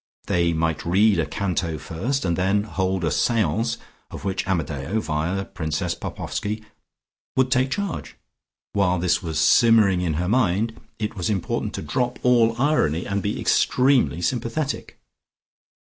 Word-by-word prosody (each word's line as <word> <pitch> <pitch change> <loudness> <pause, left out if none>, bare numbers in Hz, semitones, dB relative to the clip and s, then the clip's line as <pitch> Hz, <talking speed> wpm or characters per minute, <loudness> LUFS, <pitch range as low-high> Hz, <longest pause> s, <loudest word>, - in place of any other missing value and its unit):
They 85 -1 +1
might 80 -1 -1
read 100 +2 +3
a 80 - 0
Canto 85 -5 -2
first, 115 - -3
and 85 -2 +1
then 95 +3 +1
hold 95 -3 -1
a 80 - +1
seance 115 +2 +1 0.3
of - - -9
which 95 -1 -2
Amadeo 80 +1 -1
via 85 +2 -2
Princess 80 -4 -2
Popoffski 110 +1 -4 0.7
would 130 -1 +2
take 130 0 +3
charge. 200 +4 -4 0.6
While 90 -3 +2
this 85 0 +1
was 80 -3 -4
simmering 100 +2 +5
in 85 -4 -1
her 90 +3 -1
mind, 110 0 +1 0.2
it 105 0 -3
was 90 -1 -2
important 100 -5 -2
to - - -5
drop 125 -1 -1
all 115 -2 +3
irony 125 - +2
and 100 0 -1
be 100 +1 -2
extremely 125 - +2
sympathetic. 125 - -2
100 Hz, 145 wpm, -23 LUFS, 85-115 Hz, 0.7 s, simmering